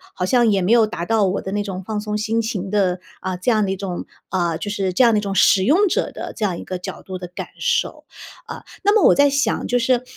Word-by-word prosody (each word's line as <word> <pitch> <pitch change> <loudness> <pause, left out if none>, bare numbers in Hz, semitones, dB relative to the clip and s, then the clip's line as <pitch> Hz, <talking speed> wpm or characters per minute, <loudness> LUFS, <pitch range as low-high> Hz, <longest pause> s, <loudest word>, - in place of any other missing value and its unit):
好 180 - -1
像 240 +3 +3
也 195 -2 +2
没 185 +5 0
有 230 -2 +6
达 170 -4 -5
到 220 -1 +2
我 190 +2 -1
的 190 - -6
那 205 +1 -1
种 190 -2 -6
放 215 -1 -3
松 210 0 -3
心 220 +2 0
情 205 -4 -4
的， 190 -3 +1 0.2
呃， 185 -1 -3
这 185 - -1
样 215 -2 +2
的 190 - -2
一 - - -1
种， 185 -2 -5 0.2
啊， 175 -3 0
就 205 - -5
是 195 -2 -1
这 255 - +4
样 235 - +6
的 210 - +3
一 - - -3
种 200 -1 -3
使 190 - +5
用 330 - +4
者 - - -1
的 - - -6
这 215 - -1
样 180 -4 -2
一 - - -7
个 185 - -4
角 180 - -7
度 185 -1 -7
的 180 - -7
感 180 - -7
受， - - -1 0.4
啊。 - - -8 0.2
那 410 +1 +4
么 435 - +4
我 - - +5
在 285 0 +5
想 275 -5 0
就 245 - +1
是， 250 0 +1
205 Hz, 300 characters per minute, -20 LUFS, 185-230 Hz, 0.4 s, 有